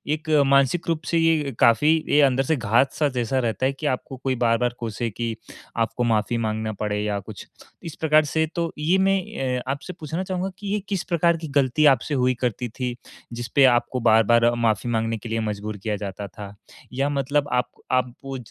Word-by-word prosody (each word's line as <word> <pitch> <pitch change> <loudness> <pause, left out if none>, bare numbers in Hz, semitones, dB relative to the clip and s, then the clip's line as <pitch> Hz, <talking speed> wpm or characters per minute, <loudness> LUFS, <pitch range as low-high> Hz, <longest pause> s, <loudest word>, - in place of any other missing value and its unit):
एक 155 +1 -10 0.2
मानसिक 140 +5 +3
रूप 165 -2 0
से 170 - 0
ये 160 -3 +2
काफ़ी 120 +6 +5 0.2
ये 150 - +5
अंदर 135 -1 +3
से 160 +4 +1
घात-सा 125 +5 +1
जैसा 120 +3 0
रहता 120 +1 -1
है 135 - +1
कि 145 +3 -8
आपको 130 0 -3
कोई 130 0 -2
बार-बार 120 +1 +2
कोसे, 115 0 -3
कि 115 +2 -4 0.4
आपको 115 +2 0
माफ़ी 115 0 +1
माँगना 110 -1 -2
पड़े 105 -1 -1
या 105 -1 -1
कुछ। 100 +1 -10 0.4
इस 165 - -7
प्रकार 155 -1 +4
से 160 +2 0
तो 170 -1 -1
ये 160 +5 +2
मैं 195 0 +3 0.4
अ, - - -7
आपसे 145 +6 -6
पूछना 160 +4 -4
चाहूँगा 185 0 -3
कि 205 - -8
ये 210 - +1
किस 195 -3 -1
प्रकार 170 0 +3
की 160 - -7
गलती 135 +4 +1
आपसे 135 +3 -1
हुई 130 -2 +2
करती 125 0 -2
थी, 125 +2 -4 0.4
जिसपे 120 +4 +1
आपको 120 +1 0
बार-बार 115 +1 +4
माफ़ी 115 0 0
माँगने 115 0 -1
के 110 +2 -9
लिए 115 0 -1
मज़बूर 105 -1 -4
किया 105 +2 -3
जाता 100 0 -6
था? 100 +2 -10 0.4
या 135 +2 0
मतलब 140 +1 0
आप 125 0 +1 0.2
आप 130 -1 +1
वो 135 -1 -5
125 Hz, 200 wpm, -23 LUFS, 115-150 Hz, 0.4 s, काफ़ी